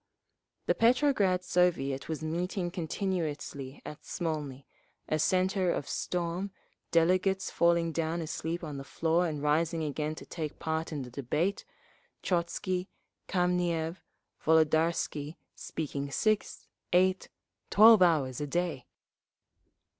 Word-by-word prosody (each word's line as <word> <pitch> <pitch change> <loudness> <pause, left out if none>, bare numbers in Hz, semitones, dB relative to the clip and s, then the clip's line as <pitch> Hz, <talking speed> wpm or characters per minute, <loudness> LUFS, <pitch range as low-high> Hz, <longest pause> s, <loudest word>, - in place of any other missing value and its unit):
_ - - -47
The - - +3
Petrograd 230 -7 +3
Soviet 165 -7 +1
was 160 0 -3
meeting 175 +3 -2
continuously 160 -6 -3
at 150 - -8
Smolny, 150 -5 -4 0.4
a 155 - 0
centre 185 +2 +2
of 145 - -1
storm, 175 +2 -2 0.4
delegates 185 +3 +2
falling 170 -1 +3
down 165 +1 -1
asleep 165 +1 -3
on 150 -3 -5
the 135 - -6
floor 165 +5 +1
and 150 -3 -4
rising 160 +2 +1
again 150 +1 -2
to - - -10
take 155 -3 -5
part 160 +1 -2
in 145 -3 -3
the 125 - -10
debate, 150 +9 -1 0.6
Trotzky, 180 +1 -1 0.4
Kameniev, 175 -2 0 0.5
Volodarsky 160 -1 +2 0.2
speaking 140 -3 -4
six, 215 +8 0 0.3
eight, 185 +1 +3 0.4
twelve 220 0 +8
hours 150 -7 +3
a 145 - -2
day…. 170 -4 -2
165 Hz, 115 wpm, -30 LUFS, 150-180 Hz, 0.6 s, twelve